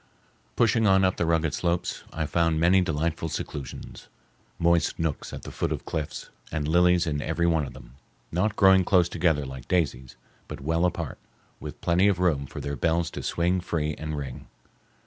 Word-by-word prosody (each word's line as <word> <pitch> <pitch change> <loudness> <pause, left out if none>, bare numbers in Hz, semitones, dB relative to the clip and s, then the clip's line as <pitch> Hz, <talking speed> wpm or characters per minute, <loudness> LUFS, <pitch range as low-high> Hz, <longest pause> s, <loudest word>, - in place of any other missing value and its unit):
Pushing 115 -1 +3
on 95 0 +5
up 95 - +1
the 85 - 0
rugged 80 -2 +1
slopes, 85 0 -1
I 80 -1 -2
found 85 0 +1
many 90 +3 +5
delightful 80 0 -1
seclusions—moist 85 +5 -3
nooks 80 -3 -3
at - - -8
the - - -7
foot - - -2
of - - -4
cliffs, 80 -2 -5 0.2
and 75 -3 -2
lilies 90 +2 +4
in 75 -3 -1
every 80 +2 -1
one 80 -4 +2
of - - -10
them, - - -13 0.4
not 100 +5 0
growing 95 -2 +6
close 90 -2 +4
together 80 -5 +1
like 65 -1 -9
daisies, 70 -8 -1 0.3
but - - -7
well 80 +5 +1
apart, 85 -4 -3 0.4
with - - -8
plenty 90 +3 +3
of 100 -3 +2
room 80 -7 +1
for - - -8
their 70 0 -4
bells 85 +3 0
to - - -6
swing 90 +2 0
free 75 -3 -2
and 75 -1 -4
ring. 70 -3 -7
85 Hz, 180 wpm, -26 LUFS, 75-90 Hz, 0.4 s, growing